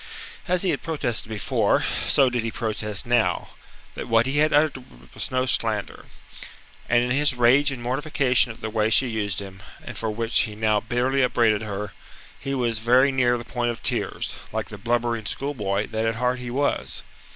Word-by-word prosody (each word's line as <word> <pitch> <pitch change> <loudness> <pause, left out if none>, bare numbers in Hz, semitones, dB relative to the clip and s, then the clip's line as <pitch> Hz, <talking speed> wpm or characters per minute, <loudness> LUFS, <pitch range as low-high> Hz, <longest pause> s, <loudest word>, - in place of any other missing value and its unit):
As 180 +1 +2
he 185 - +2
had - - -2
protested 120 -9 -2
before, 110 -2 +1 0.2
so 135 - +4
did 120 -1 0
he 115 - -2
protest 105 -3 -2
now, 120 -1 +1 0.4
that - - -6
what 115 0 +3
he 135 +2 0
had 155 +1 +3
uttered 145 -3 +2 0.3
was - - -3
no 130 0 0
slander. 110 -5 -1 0.8
And 120 0 +4
in 125 - -2
his 145 0 +2
rage 130 +4 +4
and 125 -3 -6
mortification 130 -1 +2
at 115 - -13
the 110 - -4
way 110 0 +1
she 130 +4 +4
used 105 -3 -1
him, 95 -1 -10 0.2
and 125 - -8
for 110 +1 -3
which 115 +2 0
he 110 -2 -1
now 110 -1 +2
bitterly 125 +5 0
upbraided 115 -4 +2
her, 105 -1 -5 0.5
he 135 0 -3
was 120 -4 0
very 125 +4 +4
near 125 -2 +2
the 120 - -8
point 120 -1 -2
of 120 - -5
tears, - - -2
like 110 0 -3
the 105 - -9
blubbering 115 0 -1
schoolboy 105 -8 -2
that 110 0 -1
at 115 - 0
heart 125 +2 0
he 125 -1 -6
was. 140 +4 -1
120 Hz, 190 wpm, -24 LUFS, 110-130 Hz, 0.8 s, so